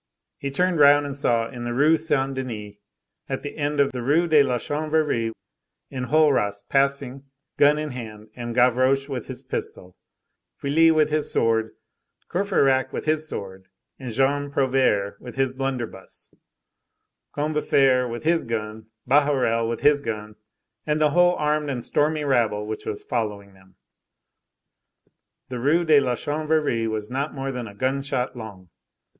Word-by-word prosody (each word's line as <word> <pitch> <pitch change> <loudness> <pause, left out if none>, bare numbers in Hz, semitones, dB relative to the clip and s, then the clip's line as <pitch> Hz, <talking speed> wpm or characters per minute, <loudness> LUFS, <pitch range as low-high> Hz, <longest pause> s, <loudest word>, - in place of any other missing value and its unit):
He 140 - -3
turned 180 +4 0
round 145 0 +6
and 140 -1 -5
saw 115 -5 +1
in 120 -1 -8
the 120 0 -3
Rue 150 +5 +4
Saint 145 -4 0
Denis, 115 -6 -6 0.6
at - - -3
the 145 - -6
end 145 0 -2
of 140 -1 +3
the 125 - -5
Rue 150 +8 +2
de 155 -3 +5
la 130 -3 +1
Chanvrerie, 150 -5 -1 0.6
Enjolras 130 -6 +1
passing, 140 -1 0 0.3
gun 145 +1 +5
in 150 -1 -4
hand, 110 -3 -9
and 120 -1 -6
Gavroche 130 +2 +3
with 130 -5 -5
his - - -5
pistol, 90 0 -6 0.6
Feuilly 160 +4 +3
with 155 -2 +3
his 155 0 +1
sword, 110 -1 +1 0.6
Courfeyrac 140 -9 +1
with - - -5
his 155 0 +1
sword, 95 -6 -7 0.3
and 130 -3 -6
Jean 140 +4 +1
Prouvaire 130 -8 +1
with 125 - -10
his 135 -1 +1
blunderbuss, 130 -7 -5 1.0
Combeferre 140 -4 +2
with 115 0 -6
his 165 +1 +2
gun, 110 -1 -5 0.2
Bahorel 130 -5 +2
with 115 - -4
his 145 -1 +4
gun, 110 -4 -5 0.5
and 150 0 -1
the 150 -1 +3
whole 175 +2 +4
armed 150 -1 0
and 125 -4 -3
stormy 150 +1 +1
rabble 115 -7 +1
which 110 0 -6
was 105 - -5
following 105 -4 -3
them. 95 0 -22 1.7
The 125 -1 -5
Rue 150 +7 +2
de 155 -2 +6
la 125 -3 0
Chanvrerie 150 -4 -1
was 110 +1 -4
not 140 +4 -3
more 135 0 -3
than 125 -3 -5
a 100 - -12
gunshot 130 +1 -2
long. 100 -7 -10
135 Hz, 150 wpm, -23 LUFS, 115-150 Hz, 1.7 s, round